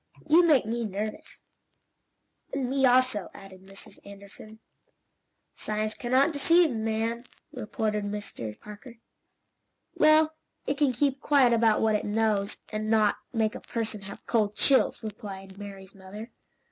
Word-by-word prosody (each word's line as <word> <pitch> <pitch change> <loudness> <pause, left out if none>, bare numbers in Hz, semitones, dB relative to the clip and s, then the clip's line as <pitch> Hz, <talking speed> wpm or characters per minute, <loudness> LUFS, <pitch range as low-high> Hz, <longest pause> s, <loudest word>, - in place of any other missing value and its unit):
"You 325 +4 +6
make 300 -9 +4
me 235 +2 -2
nervous." 210 +1 -5 1.1
"And 260 -2 -2
me, 270 -1 +3
also," 250 -6 +2
added 190 -1 -13
Mrs. 195 0 -11
Anderson. 200 +2 -12 1.0
"Science 215 0 -3
can 240 +1 -6
not 275 +5 +4
deceive, 330 +3 +4
madam," 225 +1 -2 0.3
retorted 215 -5 -3
Mr. 200 - -6
Parker. 210 +4 -12 1.0
"Well 310 +1 +4 0.3
it 280 +1 -2
can 290 -3 +3
keep 270 +2 -1
quiet 270 -5 +4
about 225 -2 +3
what 220 -1 +2
it 210 - -1
knows, 210 -1 0 0.2
and 215 0 -3
not 215 -2 +3
make 220 -3 0
a - - -7
person 225 -3 -4
have 195 0 -11
cold 210 -3 0
chills," 270 -3 +2
replied 195 -2 -8
Mary's 195 -1 -10
mother. 205 +4 -10
220 Hz, 135 wpm, -27 LUFS, 205-255 Hz, 1.1 s, You